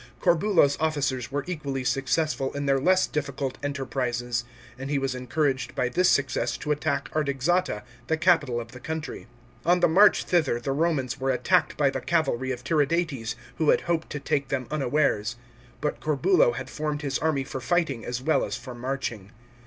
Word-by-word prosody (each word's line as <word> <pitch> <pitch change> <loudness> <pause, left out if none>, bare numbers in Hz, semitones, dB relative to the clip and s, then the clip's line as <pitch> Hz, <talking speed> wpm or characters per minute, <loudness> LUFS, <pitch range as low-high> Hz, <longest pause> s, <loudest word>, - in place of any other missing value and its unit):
Corbulo's 170 -4 +3
officers 140 -6 -1
were 145 0 -1
equally 140 -7 -3
successful 135 +2 0
in 145 0 -3
their 135 -1 +3
less 185 +6 +4
difficult 140 -3 -3
enter 140 -1 -3
prises, 120 -2 -2 0.4
and 135 +1 -5
he 145 - +1
was 135 -1 -1
encouraged 130 +1 -1
by 125 - 0
this 180 +8 +3
success 130 -4 +1
to 150 - -3
attack 150 0 0
Artaxata, 145 - 0 0.2
the 160 - +1
capital 160 -8 +3
of 115 -1 -8
the 125 - -10
country. 160 +3 -5 0.4
On 175 +2 +4
the - - +5
march 195 +5 +5
thither 155 -9 +1
the 135 - -3
Romans 140 -3 0
were 135 0 -1
attacked 150 +6 +2
by 140 -2 +3
the - - -4
cavalry 135 -6 0
of 125 -1 -5
Tiridates, 145 -4 0 0.2
who 155 - +3
had - - +4
hoped 170 -2 -1
to 145 - -4
take 140 0 -1
them 130 -2 -2
unawares. 135 -6 +1 0.5
But 150 - -2
Corbulo 370 - +3
had - - -5
formed 150 -1 -3
his 140 -1 -1
army 155 -4 +1
for 130 0 -6
fighting 150 -6 0
as 125 +1 -4
well 155 +2 +2
as - - -3
for 130 - -9
marching. 120 -5 -4
140 Hz, 180 wpm, -26 LUFS, 130-160 Hz, 0.5 s, the